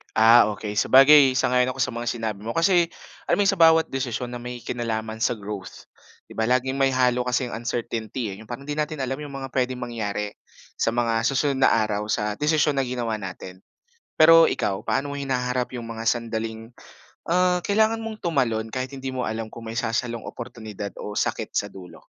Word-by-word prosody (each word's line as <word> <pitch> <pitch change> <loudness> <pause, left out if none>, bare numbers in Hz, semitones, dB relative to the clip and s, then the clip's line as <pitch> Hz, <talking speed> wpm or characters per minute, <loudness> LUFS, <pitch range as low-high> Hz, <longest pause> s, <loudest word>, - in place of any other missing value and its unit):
Ah, 115 +2 +7
okay. 105 0 -6
Sabagay, 135 +1 +7
sang-ayon 125 0 +2
ako - - -12
sa 125 - -2
mga 120 0 -5
sinabi 110 -4 -3
mo. 115 - -4
Kasi 175 0 +4 0.4
alam - - +2
mo - - +4
sa 195 - 0
bawat 160 -1 +5
desisyon 125 -2 -3
na 120 - -6
may 125 0 -7
kinalaman 110 -2 -3
sa 120 +1 +1
growth, 105 -2 -8 0.4
di - - -17
ba 110 0 +1
laging 130 +2 +1
may 135 0 +3
halo 125 -1 +2
kasi 125 +1 0
ang 115 +1 -6
uncertainty 115 -1 -3
eh. 95 - -7
'Yong 110 - -13
parang 120 +4 -7
'di 145 - -3
natin 150 -2 -2
alam 130 +1 -2
'yong 145 -1 -7
mga 135 -1 -6
puwedeng 130 -1 -1
mangyari 105 -4 -3 0.5
sa 115 - +2
mga 115 -1 +1
susunod 135 0 0
na - - +6
araw 105 0 -2
sa 105 0 -1
desisyon 150 -1 +2
na - - +2
ginawa 120 -3 -2
natin. 95 -1 -8 0.6
Pero 165 +1 +7
ikaw, 95 -1 -2
paano 145 +1 -1
mo - - -4
hinaharap 125 -2 -2
'yong 120 -1 -5
mga 115 0 -6
sandaling 115 -1 -3 0.6
ah, 180 +1 +2
kailangan 220 +2 +2
mong 220 -1 -7
tumalon 125 -10 0
kahit 130 0 -3
hindi 135 -1 -5
mo 130 - -2
alam 110 0 -4
kung 115 -1 -10
may 110 - -5
sasalong 120 -1 -2
oportunidad 110 -4 -7
o 105 - -6
sakit - - -1
sa - - +1
dulo? 90 -2 -12
125 Hz, 195 wpm, -24 LUFS, 110-135 Hz, 0.6 s, Ah